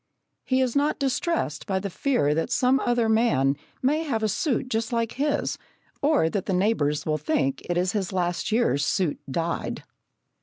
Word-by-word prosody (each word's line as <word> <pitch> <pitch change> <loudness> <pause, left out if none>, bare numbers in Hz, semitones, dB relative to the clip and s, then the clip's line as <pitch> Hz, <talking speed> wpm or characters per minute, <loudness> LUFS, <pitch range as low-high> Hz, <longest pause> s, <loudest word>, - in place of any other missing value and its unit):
He 260 0 +1
is 255 -2 0
not 290 +2 +2
distressed 275 - -1
by 190 -2 0
the 195 0 -3
fear 175 - +1
that 165 +2 -1
some 260 +1 +3
other 240 -3 +1
man 220 - +3 0.3
may 295 +5 +2
have 245 -9 -2
a - - +3
suit 255 - 0
just 225 -1 -2
like 230 -1 0
his, 290 +2 -1 0.4
or 285 - +3
that 190 +3 -2
the 195 - 0
neighbours 155 -7 +1
will 155 -1 0
think 135 -2 0
it 175 - 0
is 180 +1 +1
his 200 -3 -2
last 175 0 -1
year's 215 - +2
suit 165 +1 0
dyed. 165 +4 -2
220 Hz, 180 wpm, -25 LUFS, 170-255 Hz, 0.4 s, some